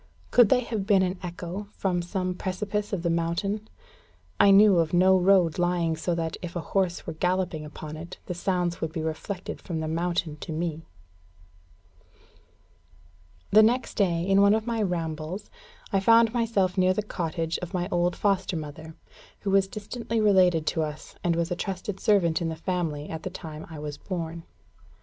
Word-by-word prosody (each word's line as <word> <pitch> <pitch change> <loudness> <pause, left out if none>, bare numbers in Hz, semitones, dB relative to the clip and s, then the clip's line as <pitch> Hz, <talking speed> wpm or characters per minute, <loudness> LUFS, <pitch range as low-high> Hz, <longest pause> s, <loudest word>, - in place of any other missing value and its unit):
Could 240 -4 +6
they 250 - +4
have 220 -5 -4
been 195 -3 +5
an 185 0 -2
echo 180 +3 -6
from 180 -3 0
some 185 +1 -2
precipice 205 +3 -3
of 190 -4 -2
the 170 - +1
mountain? 185 +6 -1 0.7
I 200 - +7
knew 195 -2 +7
of 165 +1 +1
no 185 +2 +6
road 185 -3 +4
lying 175 -2 +1
so 170 +2 -1
that, 165 -1 -3
if 175 -1 -7
a - - -1
horse 185 -3 0
were 165 - -4
galloping 180 -1 -1
upon 150 0 -8
it, 165 +2 -8
the - - -4
sounds 175 -1 -1
would 160 - -2
be 160 -1 -4
reflected 175 +4 -5
from 165 -3 -4
the 160 - -3
mountain 165 -1 -1
to 160 - -7
me. 160 0 -2 2.7
The 215 - +8
next 235 +3 +2
day, 175 -5 +1
in 195 0 +5
one 200 +1 +6
of 220 0 -2
my 230 -2 -1
rambles, 170 0 -3 0.4
I 195 - +4
found 230 +3 +5
myself 205 -6 +1
near 185 0 +4
the 210 - -1
cottage 165 -4 -3
of 180 +2 -6
my 175 0 -1
old 175 0 +1
foster 195 -3 0
mother, 155 +1 -8 0.5
who 200 - -1
was 195 0 +4
distantly 225 +3 -4
related 185 -6 +4
to 160 - 0
us, 150 -1 -5
and 170 -1 +2
was 170 0 -1
a - - +1
trusted 190 +2 -4
servant 180 -7 +2
in 165 - -1
the 160 - -4
family 160 -4 -2
at 160 -1 -5
the - - -4
time 155 -1 -8
I 160 - -8
was 150 -1 -6
born. 170 -3 -5
180 Hz, 180 wpm, -26 LUFS, 165-195 Hz, 2.7 s, The